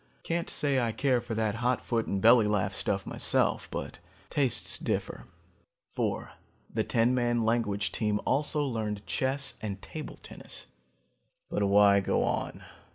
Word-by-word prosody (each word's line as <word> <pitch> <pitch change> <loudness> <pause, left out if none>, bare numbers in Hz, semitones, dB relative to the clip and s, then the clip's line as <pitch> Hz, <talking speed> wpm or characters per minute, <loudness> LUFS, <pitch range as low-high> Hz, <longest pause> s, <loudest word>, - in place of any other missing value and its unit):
Can't 170 +1 -2
say 140 -2 +1
I 115 -2 0
care 130 -2 +1
for 115 -1 -5
that 110 -1 0
hot 125 +1 +2
foot 115 -2 -1
and 100 - -1
belly 115 +1 +6
laugh 95 -2 0
stuff 95 0 -1
myself, - - 0
but - - -6 0.3
tastes 135 -5 +3
differ. - - -3 0.6
"Four, - - -2 0.4
the - - +1
ten 115 +2 +2
man 120 -2 +1
language 110 -3 0
team 105 -2 0
also 150 +1 +2
learned 105 -5 -3
chess 130 +6 -2
and 100 -3 -4
table 155 +8 -8
tennis. - - -7 0.8
"But - - -1
why 100 0 +6
go 95 - +1
on? - - -2
115 Hz, 150 wpm, -29 LUFS, 105-130 Hz, 0.8 s, belly